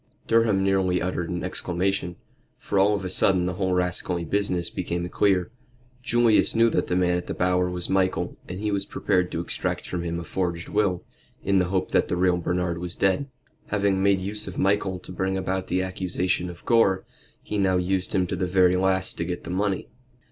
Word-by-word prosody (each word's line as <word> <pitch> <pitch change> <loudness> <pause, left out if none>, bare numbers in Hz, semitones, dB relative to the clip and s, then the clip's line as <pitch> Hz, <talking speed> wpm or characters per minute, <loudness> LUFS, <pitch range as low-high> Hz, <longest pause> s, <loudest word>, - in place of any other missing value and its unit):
Durham 115 -4 +3
nearly 95 -2 +2
uttered 90 -1 -2
an 90 -1 -3
exclamation, 90 0 -2 0.4
for 100 - -1
all 100 +2 +4
of 95 -2 -4
a - - -1
sudden 90 -1 +2
the 90 - -1
whole 95 0 -1
rascally 90 -1 0
business 90 -2 -1
became 85 -1 -3
clear. 95 0 +1 0.5
Julius 120 -3 +3
knew 115 0 +4
that - - 0
the 90 - 0
man 90 -1 +2
at 90 - -5
the - - -4
Bower 90 0 +1
was 90 -1 +2
Michael, 95 -2 0
and 90 +1 -5
he 105 0 -1
was 100 -1 -1
prepared 90 -2 0
to 85 - -2
extract 85 - -3
from 90 - -3
him 85 0 -3
a - - -5
forged 85 -1 -3
will, 100 -4 0 0.4
in 95 0 +3
the 90 - +2
hope 95 +1 -1
that - - +2
the 90 - -1
real 90 0 +3
Bernard 90 0 -1
was 90 0 -4
dead. 95 +9 +1 0.4
Having 100 -2 +1
made 100 0 +3
use 105 +3 -4
of 95 - -7
Michael 95 -1 +1
to 90 - -11
bring 95 +1 -1
about 95 0 -2
the 95 +1 0
accusation 90 -1 -1
of 85 -1 -11
Gore, 100 -5 +3 0.4
he 105 - -3
now 95 -2 +3
used 90 +1 -1
him 95 - +2
to - - -3
the 90 - -1
very 90 0 +4
last 95 0 0
to - - 0
get 90 +1 -4
the - - -6
money. 95 +1 -1
95 Hz, 205 wpm, -25 LUFS, 90-95 Hz, 0.5 s, all